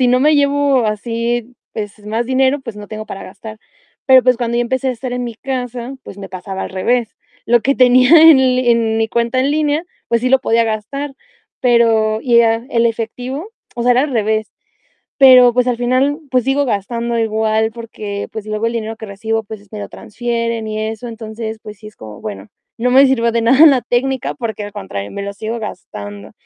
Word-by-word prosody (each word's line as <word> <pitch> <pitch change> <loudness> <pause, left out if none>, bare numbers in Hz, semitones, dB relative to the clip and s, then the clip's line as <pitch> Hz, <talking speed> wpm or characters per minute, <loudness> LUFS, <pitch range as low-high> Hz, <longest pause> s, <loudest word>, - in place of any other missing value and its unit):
si 250 - +4
no 250 +1 +4
me 300 +4 +4
llevo 285 -3 +2
así, 230 +3 -2 0.2
pues 205 0 -7
más 225 +3 -2
dinero, 265 +2 +2
pues 230 -5 -8
no 210 0 -10
tengo 215 0 -7
para 195 - -7
gastar". 215 +3 -10 0.5
Pero 260 -1 +7
pues 255 -1 +4
cuando 235 -1 -2
ya 240 - +2
empecé 260 +2 -1
a - - +2
estar 250 +1 -5
en 245 0 -3
mi 235 - -6
casa, 250 -1 -5
pues - - -11
me 195 -1 -8
pasaba 190 +1 -6
al - - -6
revés. 230 +4 -1 0.3
Lo 240 0 +4
que 275 +3 +2
tenía 255 +1 +5
en 320 -4 +8
en 240 -3 +2
mi 225 0 0
cuenta 235 +3 0
en 270 +2 +1
línea, 300 +2 0 0.2
pues 235 -1 +1
sí 255 - +1
lo 265 - +5
podía 230 -2 +2
gastar, 250 +6 -4 0.5
pero 225 -3 +3
ya 235 -2 +4
el 235 0 +2
efectivo, 245 - -4 0.3
o 235 - -2
sea, 245 +1 +4
era 245 - +3
al 295 - -2
revés. 220 -1 -1 0.7
Pero 255 -3 +7
pues 250 +1 +1
al 245 - 0
final, 255 +5 +1
pues 255 -1 +2
sigo 275 +3 +1
gastando 235 +2 -2
igual, 220 0 0
porque 215 -3 -6
pues 220 -1 -7
luego 215 +1 -2
el 230 - -3
dinero 225 -1 -4
que 220 - -8
recibo, 220 +2 -3
pues 205 -1 -11
me 215 - -7
lo 205 - -7
transfieren 230 0 -3
y 215 0 -4
eso. 225 +2 -7
Entonces, 220 -1 -7
pues 210 -1 -10
sí 215 - -11
es 215 - -14
como, 105 -2 -11
bueno, 105 -1 -7 0.3
no 245 +2 0
me 270 +2 +7
sirvió 235 -3 +1
de 230 - 0
nada 265 +7 +6
la 275 -4 +6
técnica, 260 +1 -1
porque 220 -3 -5
al 205 0 -8
contrario, 100 +1 -6
me 200 - -5
lo 200 - -4
sigo 220 +3 -5
gastando. 105 - -8
235 Hz, 210 wpm, -17 LUFS, 215-255 Hz, 0.7 s, en